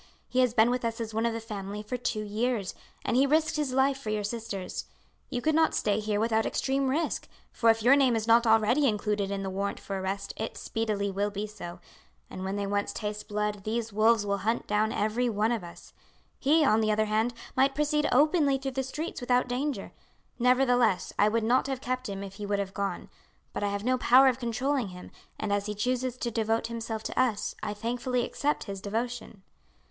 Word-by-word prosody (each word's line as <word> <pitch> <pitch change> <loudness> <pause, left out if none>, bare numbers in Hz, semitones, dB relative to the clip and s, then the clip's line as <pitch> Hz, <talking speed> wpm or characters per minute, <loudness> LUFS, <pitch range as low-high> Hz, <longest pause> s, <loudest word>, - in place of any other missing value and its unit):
"He 255 - -1
has 250 -2 +3
been 225 +1 +5
with 250 0 -1
us 230 0 -2
as 225 -1 -4
one 225 +2 +1
of 230 - -1
the 230 - -3
family 210 -2 -6
for 230 +4 -4
two 235 -3 -2
years, 215 -1 -1 0.3
and - - +1
he 270 +2 +4
risked 310 +2 +2
his 300 -4 -1
life 265 +1 +2
for 225 - -6
your 215 -1 -1
sisters. 210 -3 -4 0.4
You 245 -3 -3
could 315 - +2
not 320 +1 +3
stay 205 0 +1
here 210 -1 -1
without 220 0 +2
extreme 270 0 0
risk, 310 +5 -1 0.2
for 230 - +2
if 225 -1 +3
your 255 +4 +7
name 265 -4 +4
is 220 -1 -1
not 230 +1 +5
already 225 +6 +4
included 210 -2 0
in 200 0 -3
the 190 - -3
warrant 200 +1 -2
for 195 -1 -4
arrest 195 +1 -3
it 220 - -4
speedily 210 -3 -2
will 200 +2 0
be 205 +1 -4
so, 190 -4 -8 0.5
and 185 - -6
when 190 +1 -2
they 205 0 -1
once 200 0 -1
taste 210 0 -4
blood 210 -1 -2
these 225 0 -2
wolves 220 0 +4
will 200 0 0
hunt 225 +4 -1
down 210 +1 +1
every 225 +4 0
one 215 +1 +1
of 230 -5 -1
us. 170 0 -12 0.5
He, 300 +2 +4
on 220 -3 +4
the 215 0 +2
other 215 +1 +2
hand, 215 +3 +1 0.2
might 270 +1 +3
proceed 300 0 +1
openly 290 0 +4
through 270 0 -4
the 265 +1 -1
streets 300 +3 -5
without 245 0 +2
danger; 250 -3 -2 0.5
nevertheless, 245 -5 +3
I 210 - +5
would 225 +1 0
not 250 +4 +2
have 270 -2 -2
kept 255 -2 -3
him 195 0 -5
if 195 0 -9
he 205 -1 -5
would 205 0 +1
have 195 -1 -3
gone; 200 -1 -3 0.5
but - - -3
I - - +2
have 200 0 -2
no 255 +2 +1
power 260 +2 +6
of 255 0 -2
controlling 250 +1 -1
him, 180 -1 -10 0.3
and 200 - -1
as 205 0 0
he 210 - -3
chooses 250 +3 -1
to 240 -2 -3
devote 225 0 0
himself 225 -1 -4
to - - -3
us 235 -5 +1
I 210 -1 -3
thankfully 245 +3 -1
accept 295 +1 -1
his 195 -2 -6
devotion. 225 -1 -4
225 Hz, 220 wpm, -28 LUFS, 205-255 Hz, 0.5 s, your